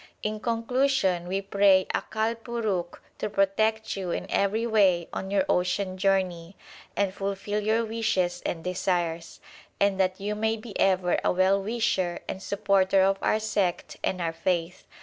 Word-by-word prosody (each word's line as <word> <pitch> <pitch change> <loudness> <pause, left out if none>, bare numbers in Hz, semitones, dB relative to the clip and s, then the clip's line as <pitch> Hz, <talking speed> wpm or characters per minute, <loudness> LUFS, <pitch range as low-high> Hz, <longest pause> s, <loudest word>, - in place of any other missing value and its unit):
In 215 0 -2
conclusion 230 -5 0
we 195 +2 -2
pray 195 -1 +4
Akal 220 +1 -1
Purukh 220 -7 -3 0.2
to - - -2
protect 215 +3 +1
you 190 -2 -4
in - - -2
every 210 +4 +1
way 195 -7 +3
on 190 - -4
your 195 -1 +2
ocean 185 +1 0
journey, 185 -2 0 0.4
and 200 -2 0
fulfil 200 +1 -3
your 220 +2 +1
wishes 190 -6 -1
and 165 -2 -3
desires; 175 -2 -2 0.4
and 200 -1 +2
that 185 0 +1
you 205 +2 -2
may 220 +1 0
be 215 -1 -10
ever 185 -2 +2
a - - +3
well 190 +2 +3
wisher 195 -5 -1
and 190 - -5
supporter 195 -2 +2
of 195 0 +2
our 215 - +2
sect 205 -5 -1
and 185 - -1
our 165 -1 -1
faith. 170 +1 -2
195 Hz, 155 wpm, -26 LUFS, 185-215 Hz, 0.4 s, pray